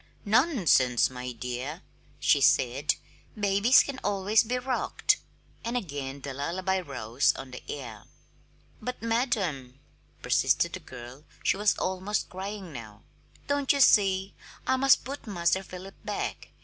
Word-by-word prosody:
"Nonsense, 200 - +3
my 125 0 -5
dear!" 125 +7 -5 0.4
she - - +3
said; 130 +4 +3 0.4
"babies 200 +5 +5
can 275 -2 -6
always 205 +2 +3
be 245 +3 -1
rocked!" 250 0 +1 0.5
And 235 +2 -1
again 140 - -5
the 140 0 -5
lullaby 180 +7 -1
rose 125 -6 0
on 135 -1 -8
the 125 - -8
air. 120 -7 -7 0.8
"But, 250 +1 -5
madam," 195 - -1 0.4
persisted - - +2
the - - -4
girl 125 +4 -11 0.2
she - - +3
was 210 +1 +2
almost 190 +3 -2
crying 190 -2 -6
now 110 -5 -10 0.4
"don't 285 -1 +1
you 280 - +1
see? 195 -6 +4 0.3
I 260 - +2
must 270 0 +4
put 275 -1 -7
Master 175 -2 +1
Philip 190 +1 -10
back. - - -4
185 Hz, 135 wpm, -28 LUFS, 135-220 Hz, 0.8 s, babies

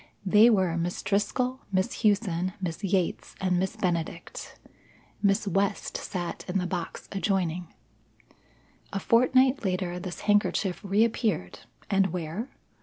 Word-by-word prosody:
They 210 +5 +7
were 190 -7 +2
Miss 175 +1 -2
Driscoll, 250 +6 0
Miss 190 +4 0
Hughson, 190 -5 +1
Miss 180 +1 -4
Yates, 190 -2 -1
and 185 -2 +1
Miss 190 0 -1
Benedict. 170 -1 -3 0.6
Miss 200 +1 +2
West 200 +2 0
sat 175 -3 -4
in 180 +1 0
the 180 - 0
box 175 -2 -4
adjoining. 180 -4 -1 1.2
A 195 - -2
fortnight 255 +5 +4
later 180 -2 -1
this 180 -1 -6
handkerchief 205 -2 +2
reappeared 205 - +1 0.3
and 195 -1 +3
where? 180 - -4
190 Hz, 120 wpm, -27 LUFS, 180-210 Hz, 1.2 s, They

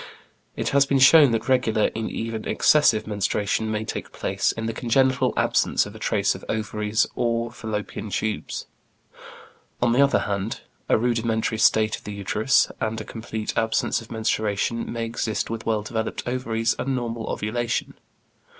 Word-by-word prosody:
It - - -1
has 140 0 +3
been 140 - +2
shown 140 +2 +8
that 115 -1 -1
regular 120 -5 +2
and 115 0 -2
even 115 -1 -4
excessive 145 -8 +4
menstruation 105 +1 -1
may 110 0 -2
take - - -5
place - - 0
in 115 - -5
the 115 - -2
congenital 130 +3 +2
absence - - +2
of - - -9
a - - -11
trace - - +1
of - - -10
ovaries 105 +1 0
or 115 0 -1
Fallopian 110 -2 -5
tubes. 110 +2 -3 1.1
On 120 -1 +2
the 125 +4 +4
other 140 0 +4
hand, 100 +2 -3 0.3
a - - +5
rudimentary 115 -1 0
state 110 0 +3
of - - -17
the 105 - -5
uterus, 105 +5 +2
and 110 0 -1
a 110 - -6
complete 110 -1 -5
absence 115 +1 +1
of 115 - -14
menstruation, 110 0 -1
may 115 -1 -2
exist 115 -1 -2
with 115 0 -5
well 110 -2 +1
developed 110 +2 -4
ovaries 115 -2 0
and 130 +1 -1
normal 115 -2 -4
ovulation. 120 +3 -2
115 Hz, 160 wpm, -24 LUFS, 110-120 Hz, 1.1 s, shown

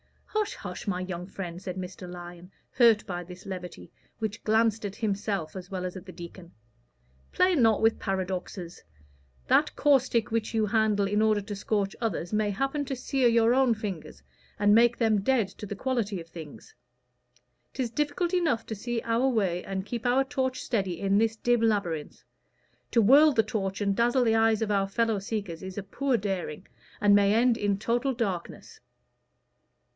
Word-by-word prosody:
"Hush, 425 -1 -2
hush, 180 0 -8
my 180 -3 -1
young 180 -1 -5
friend," 180 -3 -7
said 185 -2 -5
Mr. 185 -1 -7
Lyon, 175 0 -10 0.2
hurt 230 -4 +4
by 175 -1 -4
this 180 +1 -12
levity, 180 - -8 0.3
which 215 -2 -4
glanced 220 0 +2
at 200 -1 -4
himself 200 -6 -2
as 185 -1 -8
well 185 -2 -4
as 180 - -5
at 190 +1 -9
the - - -7
deacon. 175 0 -11 0.8
"Play 365 0 +3
not 225 -8 +4
with 225 0 +2
paradoxes. 185 -2 -4 0.6
That - - +3
caustic 255 -6 +2
which 225 0 -1
you 220 -1 +2
handle 210 -1 +2
in 205 +2 +1
order 215 -1 +3
to 205 +1 -6
scorch 200 -1 -1
others, 205 -5 -2
may 210 -1 +1
happen 270 +8 -1
to 270 - -3
sear 255 0 +1
your 230 0 +4
own 260 -3 +3
fingers 175 - -6 0.3
and 205 0 +4
make 235 +1 +5
them 220 -4 +2
dead 235 -1 +2
to 210 - -9
the 205 - -5
quality 220 -4 -1
of 165 - -10
things. 160 -3 -11 1.0
'Tis 255 -4 -2
difficult 300 +7 -1
enough 315 -11 +1
to - - -5
see 235 +3 -3
our 230 +3 +1
way 190 -7 0
and 190 -1 -4
keep 235 +2 -3
our 255 +2 +3
torch 265 -2 -2
steady 190 -7 -1
in 200 +1 +2
this 225 0 +1
dim 240 +1 +1
labyrinth: 195 -9 -1 0.7
to 230 - +3
whirl 290 +8 +7
the 225 -5 +3
torch 195 -3 -3
and 200 -1 0
dazzle 240 +3 +3
the 225 -2 +3
eyes 225 -1 +3
of 210 - -2
our 195 -1 +2
fellow 225 +1 0
seekers 195 -4 -4
is 190 0 -8
a 205 - -3
poor 255 +6 0
daring, 190 -4 -4 0.3
and 205 0 +4
may 205 +1 +4
end 240 +1 +4
in 205 -3 0
total 240 +5 0
darkness. 195 -8 -4
210 Hz, 180 wpm, -27 LUFS, 190-235 Hz, 1.0 s, whirl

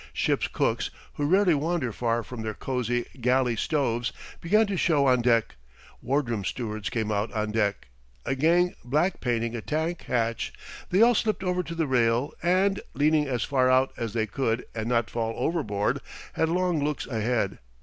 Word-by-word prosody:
Ship's - - +1
cooks, - - 0 0.2
who 145 - -1
rarely 185 +1 +4
wander 155 -3 0
far 115 +1 -1
from 120 -1 -7
their 110 -1 -4
cosey 120 -2 -1 0.2
galley 125 0 +2
stoves, 120 -2 0 0.3
began 210 +6 +3
to 200 -1 -2
show 155 -5 +2
on 125 -2 +4
deck; 115 - +2 0.4
ward 140 0 0
room 115 -4 -2
stewards 110 -2 -3
came 110 -2 -2
out 105 +2 -1
on 105 -1 -1
deck; 105 - 0 0.4
a - - 0
gang 170 +6 +3
black 150 +9 +1
painting 115 -1 -1
a 115 - -4
tank 160 +6 -2
hatch 115 -2 -1 0.4
they 190 +5 +5
all 240 +1 +6
slipped 215 -3 0
over 180 -1 0
to 170 -1 -7
the 165 -1 0
rail 125 +1 +1
and, 190 +3 +2
leaning 150 +2 +3
as 125 -3 -1
far 130 -2 +2
out 130 +1 +3
as 115 -3 -4
they 110 -2 +1
could 115 +1 -1
and 110 0 -3
not 115 -2 +2
fall 115 -1 -2
overboard, 105 -12 0 0.3
had 160 - +1
long 175 -3 +1
looks 150 0 -2
ahead. 110 -3 -1
130 Hz, 180 wpm, -26 LUFS, 115-160 Hz, 0.4 s, all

